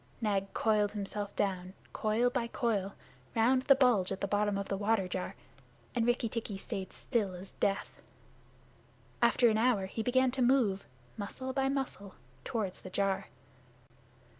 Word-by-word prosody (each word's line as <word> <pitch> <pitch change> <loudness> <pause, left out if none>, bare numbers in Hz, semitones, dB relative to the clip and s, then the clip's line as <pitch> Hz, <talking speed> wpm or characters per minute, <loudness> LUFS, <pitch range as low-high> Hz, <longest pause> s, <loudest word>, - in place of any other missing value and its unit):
Nag 200 -3 0
coiled 210 -2 +2
himself 205 0 -3
down, 190 -1 -1 0.2
coil 225 +3 +1
by 245 -2 -1
coil, 210 -5 -1 0.4
round 245 +3 +4
the 275 +1 +6
bulge 245 -9 +3
at 195 - -2
the 200 - -1
bottom 205 0 +1
of 200 - -3
the 195 - -1
water 205 -1 +1
jar, 180 0 -4 0.6
and 235 -2 +1
Rikki 240 -1 +2
tikki 220 -3 -4
stayed 190 -1 -5
still 205 -7 -1
as 185 +2 -10
death. 195 0 -2 1.2
After 235 +1 +5
an 220 -1 +3
hour 225 -5 +3
he 200 +4 -4
began 255 +2 +3
to 260 +1 -2
move, 240 -6 +3 0.3
muscle 260 +5 -5
by 270 0 +1
muscle, 260 -8 -3 0.3
toward 210 -5 -2
the 185 - -10
jar. 195 0 0
215 Hz, 155 wpm, -32 LUFS, 195-245 Hz, 1.2 s, the